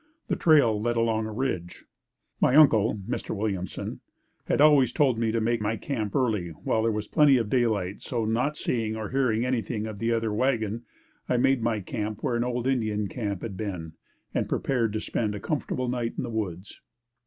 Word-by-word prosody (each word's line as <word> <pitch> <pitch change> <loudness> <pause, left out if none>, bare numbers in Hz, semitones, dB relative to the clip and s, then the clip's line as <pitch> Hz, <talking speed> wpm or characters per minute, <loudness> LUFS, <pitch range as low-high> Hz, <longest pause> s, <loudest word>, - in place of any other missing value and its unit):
The - - +2
trail 135 -10 +4
led 120 +1 0
along 110 -1 +1
a - - -6
ridge. 105 -8 -3 0.6
My 130 - +4
Uncle, 110 -9 +5
Mr. - - -3
Williamson, 100 -3 -3 0.5
had - - 0
always 145 -5 +6
told 130 -5 +2
me 115 -1 +1
to 115 - 0
make 115 0 0
my 110 +2 -1
camp 110 -8 -3
early 110 -10 +1
while 85 +7 -1
there 115 0 +2
was 105 -1 -3
plenty 150 -4 +5
of 115 -2 -2
light, 105 -6 0
so 115 -3 -2
not 125 +7 0
seeing 110 -5 -1
or 110 -1 -5
hearing 125 -4 +1
anything 115 -3 -1
of 110 -2 -6
the 115 0 0
other 115 -2 0
wagon, 115 -2 0 0.4
I 125 - +2
made 130 +1 +3
my 115 -2 0
camp 105 +1 -4
where 120 - 0
an 120 - +1
old 125 0 -2
Indian 110 -6 0
camp 100 -6 -4
had 110 -4 -5
been 90 -6 -5 0.4
and - - -1
prepared 120 -5 0
to 110 - -1
spend 105 -1 -2
a - - -5
comfortable 130 0 -2
night 120 -1 -2
in - - -2
the - - -5
woods. 100 -4 -5
115 Hz, 195 wpm, -27 LUFS, 105-125 Hz, 0.6 s, always